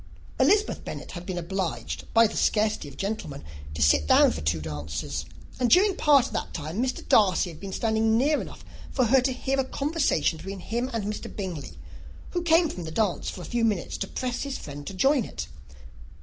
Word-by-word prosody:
Elizabeth 420 +1 +3
Bennet - - -7
had 175 -1 -8
been 185 -2 -3
obliged, 180 +1 -3
by 230 0 +6
the 220 - -2
scarcity 215 -7 +1
of 140 - -12
gentlemen, 195 -9 -4 0.3
to 75 - +1
sit 70 +1 +4
down - - +6
for 80 +2 -5
two 75 +1 0
dances; 75 -1 -4 0.3
and 250 -2 +2
during 380 - +5
part 285 -7 +5
of - - -7
that - - -3
time, 160 +6 -3
Mr. 255 0 -2
Darcy 185 -4 +4
had 155 - -12
been 195 -1 -7
standing 220 +1 +2
near 290 +5 +2
enough - - -10 0.2
for 255 - +1
her 260 +3 +5
to 260 - +1
overhear 265 +2 -1
a - - +3
conversation 285 - 0
between 195 +2 -6
him 240 +7 -2
and 230 -3 -2
Mr. 210 +1 -4
Bingley, 180 -8 -6 0.5
who 350 - -1
came 335 0 +4
from 180 - -6
the - - -5
dance 205 +1 0
for 185 - -7
a - - -7
few 235 +7 -1
minutes 210 -6 0
to - - -3
press 250 -1 -3
his 275 -2 -3
friend 145 0 -8
to 195 - -6
join 270 +6 +3
it. - - -6
215 Hz, 205 wpm, -26 LUFS, 170-260 Hz, 0.5 s, by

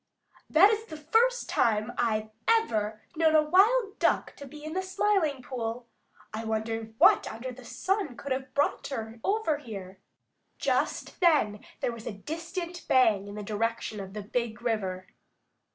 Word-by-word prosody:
"That 380 +7 +7
is 440 0 -1
the 315 -7 -8
first 460 +11 +2
time 215 0 +1
I've 215 -2 0 0.2
ever 220 - +1
known 320 -1 +4
a 310 - +6
wild 405 +6 +3
Duck - - +1
to 280 - -9
be 295 +2 -11
in 310 +1 -5
the 375 - 0
Smiling 375 -7 +1
Pool. 240 -1 -4 0.5
I 220 +1 -4
wonder 220 0 -3
what - - +5
under 255 +3 -6
the 255 +1 -12
sun 380 - -2
could 280 - -7
have 265 +1 -3
brought 290 - +1
her 225 -4 -5
over 390 -8 +1
here." 195 -8 -8 0.6
Just - - -1
then 290 - +3 0.2
there - - 0
was 230 -1 -9
a 230 - -3
distant 335 - -6
bang 220 -6 +4
in 205 - -8
the 210 - -5
direction 220 +1 -2
of 190 -1 -7
the 210 - -4
Big 235 +1 -3
River. 190 -6 -1
250 Hz, 165 wpm, -28 LUFS, 220-330 Hz, 0.6 s, That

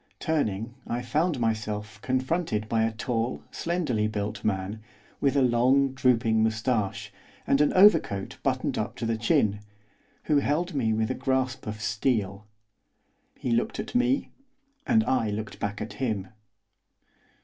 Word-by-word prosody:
Turning 115 - -1
I 120 +1 -2
found 150 +5 0
myself 110 -1 -2
confronted 130 -3 -1
by 110 0 +1
a 110 0 +2
tall, 115 +1 -2
slenderly 150 -12 -1
built 105 0 -4
man, 100 +1 -2 0.4
with 140 0 +2
a 140 - +4
long, 130 +3 +3
drooping 115 -4 +2
moustache, 110 -2 -1 0.3
and 140 - +3
an 150 - +4
overcoat 185 - +4
buttoned - - 0
up - - -3
to - - -4
the 115 0 0
chin, 110 -2 +2 0.6
who 150 - +2
held 155 +5 0
me 120 -6 +1
with 110 +2 0
a - - +1
grasp 130 -1 -1
of 105 0 -4
steel. 110 -3 -1 0.9
He 125 - -3
looked 115 +1 0
at - - -5
me, 250 +3 +1 0.6
and 225 -2 +4
I 115 - +1
looked 105 +1 -5
back 100 0 -3
at 110 - -5
him. 105 -7 -2
115 Hz, 145 wpm, -27 LUFS, 110-135 Hz, 0.9 s, a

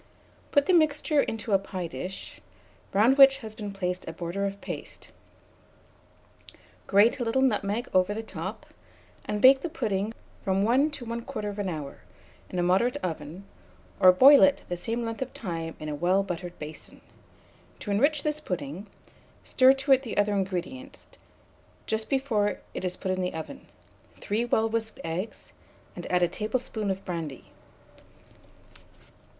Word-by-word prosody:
Put 285 -1 +4
the 370 - +2
mixture 305 -2 +3
into 220 -3 -3
a 195 - +5
pie 190 -2 -5
dish, 170 +5 -7 0.5
round 235 +8 +4
which 270 0 +9
has 215 - -8
been 210 -2 -6
placed 180 -2 -3
a 165 - -5
border 175 +4 -3
of 200 0 -6
paste, - - -8 1.8
grate 205 +5 +4
a - - 0
little 245 +3 +1
nutmeg 215 -2 0
over 185 +1 +3
the 225 - -4
top, 190 +2 -6 0.6
and 210 0 -3
bake 265 +1 +8
the 345 - -3
pudding 215 -9 -2 0.3
from 195 -1 +1
1 260 +7 +3
to 285 -5 -7
1 235 +1 -4
1/4 205 -1 -4
hour, 150 -5 -6 0.5
in 180 - -5
a 175 - +1
moderate 190 +8 +2
oven, 165 +2 -5 0.5
or 185 - +8
boil 270 +10 +8
it 285 -1 +4
the 175 - -1
same 230 +6 -3
length 225 +1 -5
of 260 - -4
time 165 -5 -4
in 155 - -6
a 150 - -3
well 180 +6 +2
buttered 175 -1 -6
basin. 155 +1 -9 0.8
To 205 - -4
enrich 285 +8 +2
this 300 0 -1
pudding, 180 - -5 0.6
stir 260 0 +5
to 270 0 +4
the 255 -5 -7
other 205 0 +2
ingredients, 200 +9 -4 0.8
just 220 0 -2
before 240 -7 0
it - - -5
is 180 -1 -3
put 190 - -2
in 185 0 -1
the 180 -2 -2
oven, 160 - -8 0.5
3 220 +4 -1
well 225 -2 +2
whisked 225 0 -3
eggs, 170 +6 -5 0.4
and - - -7
add 180 -1 +3
a - - +4
tablespoonful 215 +2 -3
of 190 0 -3
brandy. 165 -7 -6
205 Hz, 155 wpm, -27 LUFS, 180-245 Hz, 1.8 s, which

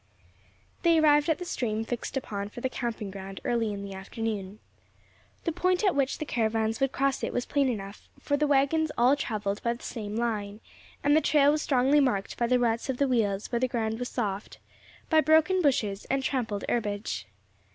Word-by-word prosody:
They 335 -1 +4
arrived 295 0 +4
at 320 - +2
the 360 - -6
stream 225 -8 -2
fixed 245 +3 -4
upon 200 -5 -4
for 225 - -9
the 260 - -1
camping 235 -6 -4
ground 195 0 -8
early 230 -3 +1
in 200 -1 -5
the 200 -1 -7
afternoon. 200 0 -4 0.9
The 335 - 0
point 365 +4 +1
at 390 -4 +4
which 275 -1 0
the 310 - -4
caravans 225 -3 0
would 270 -1 +1
cross 275 0 0
it - - -1
was 245 - -2
plain 280 -2 +1
enough, 200 -4 -6
for 285 - 0
the 300 +1 +1
waggons 290 +3 +2
all 250 +4 +5
travelled 210 -6 -3
by 235 - 0
the 235 - -15
same 210 -3 -5
line, 215 -3 -2 0.4
and 290 +1 +4
the 315 - +5
trail 290 -2 +4
was 305 0 0
strongly 270 +1 +3
marked 245 -9 0
by 235 - 0
the 250 +1 +3
ruts 235 0 0
of 255 - -2
wheels 225 -8 +1
where 235 - +1
the 255 - +2
ground 225 -2 -2
was 245 - -3
soft, 205 -4 -3 0.5
by 315 -1 +6
broken 315 +5 +4
bushes, 215 - +1
and 270 0 -1
trampled 235 -7 -2
herbage. 205 - -2
240 Hz, 195 wpm, -28 LUFS, 210-280 Hz, 0.9 s, by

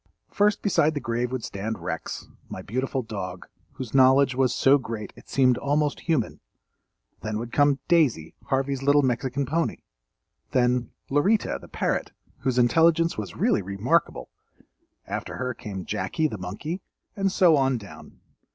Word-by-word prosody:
First 205 0 +2
beside 160 -6 +2
the - - 0
grave 120 -1 -2
would 130 -3 -3
stand 110 +3 -4
Rex, 85 -2 -5 0.2
my - - -7
beautiful 130 +3 -2
dog, 95 -5 -6 0.3
whose 125 -4 -7
knowledge 135 +1 +5
was 130 0 +2
so 140 +2 +4
great 115 -4 -6
it - - -17
seemed 130 -2 +3
almost 145 +1 0
human; 155 -9 -1 0.8
then 110 0 -3
would 120 +1 -5
come 145 0 +3
"Daisy," 140 - +2
Harvey's 135 0 -1
little 145 +1 +4
Mexican 130 +2 0
pony; 165 +5 -1 0.8
then 125 -2 +2 0.2
"Lorita," 195 +10 +2
the - - -12
parrot, - - -2 0.3
whose 130 -2 -1
intelligence 165 +7 +4
was 100 -5 -6
really 105 - +2
remarkable; 100 +1 0 0.7
after - - -5
her 125 0 -2
came 105 -6 -7
"Jackie," 105 - -1
the 110 -9 -6
monkey, 130 - -5 0.3
and 195 -1 0
so 175 -4 +5
on 135 -2 +2
down. 100 -9 -13
130 Hz, 150 wpm, -25 LUFS, 110-145 Hz, 0.8 s, knowledge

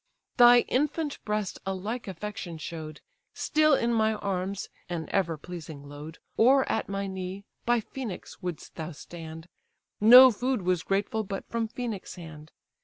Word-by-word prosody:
Thy 240 -1 +8
infant 295 +4 -1
breast 210 -2 -2
a 195 0 -2
like 215 +6 -4
affection 190 -2 -6
show'd; 155 -1 -7 0.3
Still 310 -1 +3
in 235 -2 +1
my 220 -1 +2
arms 195 -1 -3 0.2
(an 165 -3 -3
ever 170 -5 +1
pleasing 160 -3 -9
load) 150 +3 -9 0.2
Or 265 +4 +5
at 220 - -1
my 200 0 -2
knee, 190 +1 -5 0.2
by 240 -1 +3
Phœnix 230 -4 -7
wouldst 175 -4 -6
thou 160 0 -5
stand; 160 +1 -9 0.5
No 250 +4 +10
food 245 -1 -1
was 180 -2 +1
grateful 200 +4 -1
but 195 -1 -6
from 230 -1 -1
Phœnix' 225 -4 -5
hand. 155 -3 -11
195 Hz, 150 wpm, -28 LUFS, 170-235 Hz, 0.5 s, No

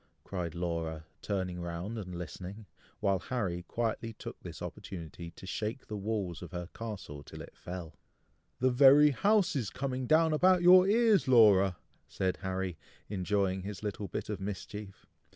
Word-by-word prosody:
cried 90 -4 -4
Laura, 85 -2 -3 0.2
turning 90 -3 -2
round 85 +6 -4
and 90 -5 -6
listening, 90 +5 -7 0.4
while 100 -2 +2
Harry 95 -6 -2
quietly 115 +3 -2
took - - -9
this - - -8
opportunity 85 -1 -7
to 90 - -13
shake 110 +7 -3
the 105 - -6
walls 100 -4 -3
of 90 - -8
her 90 -1 -5
castle 100 -10 -6
till - - -11
it - - -10
fell. 90 -3 -7 0.7
"The 130 +1 +3
very 140 +3 +7
house 200 - +3
is 120 -8 -1
coming 130 -2 -3
down 160 +2 +4
about 180 +3 +4
your 185 +1 +8
ears, 220 - +4
Laura!" 100 -7 +6 0.3
said 95 -1 -1
Harry, 95 -3 -3 0.3
enjoying 95 -1 0
his 100 +1 -7
little 105 -1 -3
bit - - -4
of 105 -3 -4
mischief. 100 0 -6
100 Hz, 155 wpm, -31 LUFS, 90-125 Hz, 0.7 s, your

